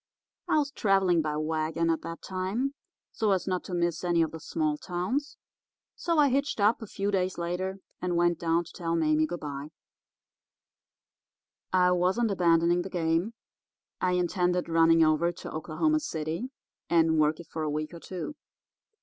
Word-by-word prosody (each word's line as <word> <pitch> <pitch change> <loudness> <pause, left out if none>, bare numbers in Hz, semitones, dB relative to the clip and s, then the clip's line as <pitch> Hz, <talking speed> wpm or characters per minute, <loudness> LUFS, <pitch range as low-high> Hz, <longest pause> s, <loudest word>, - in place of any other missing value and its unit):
I - - +4
was 290 -2 +1
travelling 195 - +3
by 150 -1 -2
wagon 160 +1 0
at 165 - -1
that 165 0 -7
time 195 +9 -2 0.4
so 215 -3 +1
as 185 - -1
not 185 -2 -1
to 180 - -4
miss 170 -1 0
any 170 -2 +3
of 160 - -2
the 160 - -7
small 155 -1 -1
towns; 185 - -3 0.6
so 335 -2 -1
I 290 -2 +5
hitched 280 -1 0
up 210 +4 +3
a 220 - -7
few 200 +1 -2
days 185 -2 0
later 180 +3 -2 0.2
and 180 -1 -1
went 175 0 +2
down 165 0 +1
to 165 - -13
tell 165 -1 -2
Mame 155 -1 +2
good 175 +1 -5
bye. 145 0 -6 2.0
I 180 -1 +4
wasn't 185 +6 +2
abandoning 170 -1 +3
the 190 - -6
game; 175 +4 0 0.7
I 180 0 +2
intended 180 0 +1
running 165 0 +5
over 155 +2 +2
to 175 - -8
Oklahoma 170 - 0
City 165 - -3 0.4
and 165 -2 +4
work 155 +1 +2
it 170 - -9
for 160 - -6
a 155 - -1
week 155 +2 -3
or 170 - -8
two. 185 - -6
175 Hz, 170 wpm, -28 LUFS, 165-190 Hz, 2.0 s, I